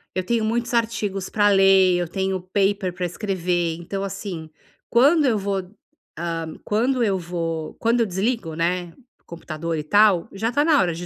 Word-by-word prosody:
eu 185 - -1
tenho 230 +1 0
muitos 235 +2 -1
artigos 210 -5 -1
pra 205 -1 +3
ler, 195 -2 +5
eu 175 -1 -1
tenho 190 +1 -2
paper 200 -2 +1
pra 180 0 -3
escrever. 175 -3 -1
Então 190 +3 -5
assim, 190 -5 -6 0.4
quando 285 +6 +4
eu 230 -5 +2
vou, 200 0 -1 0.6
hã, 165 -1 -4
quando 240 +4 +1
eu 195 -3 +1
vou 165 -2 -4
quando 235 +1 +2
eu 230 - +3
desligo, 195 -3 -2
né, 175 +1 -1 0.3
o - - -42
computador 165 -1 -5
e 150 - -3
tal, 205 0 +4
já 220 +4 -2
tá 290 +3 +2
na 310 -2 +4
hora 175 -3 +1
de 175 +2 -6
195 Hz, 180 wpm, -22 LUFS, 175-220 Hz, 0.6 s, ler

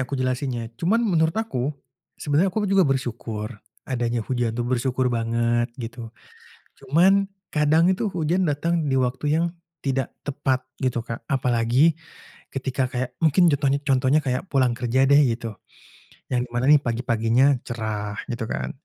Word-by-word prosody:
aku 140 - -2
jelasinnya, 130 -1 -1 0.2
cuman 210 +8 +2
menurut 160 +2 +2
aku, 220 - -2 0.6
sebenarnya 150 +6 +1
aku 215 +4 -2
juga 195 -2 +5
bersyukur 115 -5 -3 0.4
adanya 120 -2 -1
hujan 120 -3 0
tuh, 120 - -1
bersyukur 125 +1 0
banget, 120 +1 0
gitu. 120 -1 -7 0.7
Cuman 170 +7 +4 0.4
kadang 150 +2 +4
itu 190 - -1
hujan 175 +2 +1
datang 155 +4 0 0.2
di - - +1
waktu 125 +2 -1
yang 170 - +2 0.4
tidak 135 -2 0 0.2
tepat 135 -2 -1 0.2
gitu, 130 -2 0
Kak. 115 0 -6
Apalagi, 125 +3 +3 0.6
ketika 135 0 -2
kayak 125 0 -2
mungkin 165 +3 +5
contohnya 140 -1 +1
contohnya 135 0 +2
kayak 125 -1 0
pulang 130 -3 +3
kerja 125 +1 0
deh 145 +1 +7
gitu, 115 -2 -5 0.7
yang 125 - +2
di - - -29
mana 120 +1 +1
nih 150 - +7
pagi 120 -3 -3
paginya 115 +1 +2 0.2
cerah 110 -3 -3 0.2
gitu 120 0 -3
kan, 65 - -3
130 Hz, 150 wpm, -23 LUFS, 120-145 Hz, 0.7 s, deh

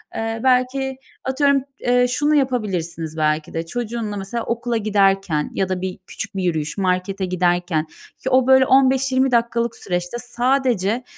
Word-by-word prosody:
eee, 225 0 -2
belki, 260 +1 +1 0.3
atıyorum, 275 +1 +2 0.2
eee, 245 0 +3
şunu 295 +4 +1
yapabilirsiniz 185 - -1
belki 155 0 0
de. 165 0 -3
Çocuğunla 225 +1 -4
mesela 200 +4 -4
okula 235 0 -1
giderken 195 -7 +1
ya 190 -1 -1
da 185 -1 -2
bir 185 -1 -4
küçük - - -7
bir 190 - -2
yürüyüş, 155 -2 -1
markete 190 0 0
giderken 175 -3 0 0.4
o, 260 -1 +3
böyle, 265 0 +6
15-20 265 0 +3
dakikalık 235 0 +1
süreçte 180 +4 -3
sadece 245 -3 0
225 Hz, 140 wpm, -21 LUFS, 180-255 Hz, 0.4 s, böyle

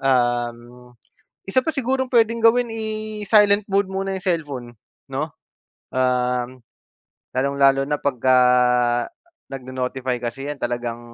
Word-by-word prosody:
Um. 120 -1 -1 0.5
Isa 260 +6 +2
pa 320 - 0
sigurong 260 -2 -1
puwedeng 230 -1 +2
gawin 240 +1 +5
i-silent 215 -2 +1
mode 200 0 +2
muna 195 0 -3
yung 190 - -5
cellphone 145 -8 -2 0.4
'no, - - -3 0.6
um. 125 0 0 0.7
Lalong 140 +2 0
lalo 135 0 +5
na 145 +1 -2
pagka 130 -2 +2 1.1
nagnonotify 130 -1 -3
kasi 130 +4 -4
'yan 145 -1 -4
talagang. 120 -1 -3
135 Hz, 115 wpm, -22 LUFS, 125-210 Hz, 1.1 s, gawin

